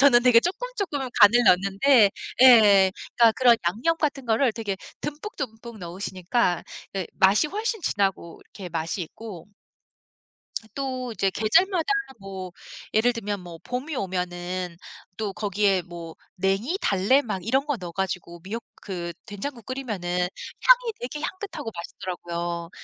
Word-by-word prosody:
저는 260 Hz, -3 st, +6 dB
되게 245 Hz, -2 st, +7 dB
쪼끔, 385 Hz, -, -2 dB
쪼끔 340 Hz, -8 st, -2 dB, 0.2 s
간을 225 Hz, +4 st, +8 dB
넣는데 200 Hz, +5 st, +5 dB, 0.3 s
예. 205 Hz, -7 st, +8 dB, 0.2 s
그러니까 230 Hz, -2 st, +6 dB
그런 245 Hz, -3 st, +6 dB
양념 240 Hz, -, 0 dB
같은 280 Hz, -4 st, -1 dB
거를 230 Hz, +2 st, +3 dB
되게 210 Hz, -4 st, -3 dB, 0.3 s
듬뿍듬뿍 270 Hz, -, -6 dB
넣으시니까 185 Hz, +2 st, -1 dB, 0.3 s
예 190 Hz, -, -2 dB
맛이 195 Hz, +9 st, +4 dB
훨씬 435 Hz, +3 st, -2 dB
진하고 195 Hz, -, -1 dB
이렇게 190 Hz, -3 st, -8 dB
맛이 165 Hz, +3 st, -2 dB
있고 185 Hz, 0 st, -9 dB, 1.3 s
또 255 Hz, -3 st, -3 dB
이제 195 Hz, -3 st, +1 dB
계절마다 330 Hz, -, +2 dB, 0.3 s
뭐 190 Hz, -2 st, -7 dB, 0.4 s
예를 235 Hz, +3 st, +3 dB
들면 210 Hz, -3 st, -3 dB
뭐 175 Hz, -2 st, -10 dB
봄이 255 Hz, +5 st, -4 dB
오면은 180 Hz, -3 st, -3 dB, 0.4 s
또 210 Hz, -3 st, -3 dB
거기에 200 Hz, -1 st, +1 dB
뭐 170 Hz, -2 st, -9 dB, 0.2 s
냉이, 195 Hz, -, 0 dB
달래 200 Hz, +8 st, +3 dB
막 195 Hz, -8 st, -5 dB
이런 265 Hz, +4 st, +2 dB
거 290 Hz, -3 st, -1 dB
넣어 180 Hz, -4 st, -7 dB
가지고 175 Hz, -2 st, -4 dB
미역 225 Hz, +5 st, -5 dB, 0.2 s
그 175 Hz, -3 st, -5 dB
된장국 230 Hz, +3 st, -6 dB
끓이면은 210 Hz, -10 st, -3 dB, 0.5 s
향이 -, -, +6 dB
되게 255 Hz, +5 st, -5 dB
향긋하고 375 Hz, -, -5 dB
맛있더라고요. 170 Hz, -1 st, -5 dB
210 Hz, 295 characters per minute, -25 LUFS, 185-255 Hz, 1.3 s, 간을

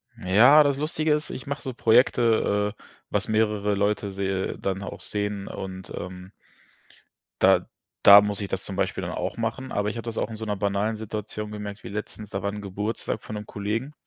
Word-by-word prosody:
Ja, 120 Hz, +11 st, +6 dB
das 140 Hz, -1 st, +1 dB
Lustige 155 Hz, +1 st, 0 dB
ist, 150 Hz, +1 st, -1 dB
ich 130 Hz, -, -7 dB
mache 140 Hz, 0 st, -3 dB
so 130 Hz, -, -5 dB
Projekte, 115 Hz, -3 st, +3 dB
äh, -, -, -21 dB, 0.3 s
was 105 Hz, -, -1 dB
mehrere 105 Hz, -2 st, +1 dB
Leute 100 Hz, 0 st, 0 dB
sehe 95 Hz, 0 st, -2 dB
dann 95 Hz, 0 st, -2 dB
auch 100 Hz, -, -7 dB
sehen 105 Hz, -1 st, -3 dB
und, 95 Hz, -1 st, -7 dB
ähm 90 Hz, +1 st, -8 dB, 1.1 s
da -, -, +5 dB, 0.4 s
da 100 Hz, +1 st, +11 dB
muss 105 Hz, 0 st, -2 dB
ich 100 Hz, -, -3 dB
das 95 Hz, 0 st, -3 dB
zum 95 Hz, -, -6 dB
Beispiel -, -, -1 dB
dann -, -, -4 dB
auch -, -, -3 dB
machen, 115 Hz, +3 st, -3 dB
aber 105 Hz, +1 st, 0 dB
ich 115 Hz, -, -5 dB
habe 115 Hz, -, -6 dB
das 115 Hz, -1 st, -5 dB
auch -, -, -1 dB
in 110 Hz, -, -7 dB
so 110 Hz, -, -5 dB
'ner 105 Hz, -1 st, -1 dB
banalen 100 Hz, +2 st, 0 dB
Situation 105 Hz, 0 st, -5 dB
gemerkt 105 Hz, 0 st, -7 dB
wie -, -, -7 dB
letztens, 105 Hz, 0 st, -6 dB
da 100 Hz, -2 st, -3 dB
war 100 Hz, +1 st, -1 dB
'n 105 Hz, 0 st, -6 dB
Geburtstag 105 Hz, +3 st, -3 dB
von 110 Hz, -, -6 dB
'nem 105 Hz, 0 st, -5 dB
Kollegen. 110 Hz, +8 st, -3 dB
105 Hz, 205 wpm, -25 LUFS, 100-115 Hz, 1.1 s, da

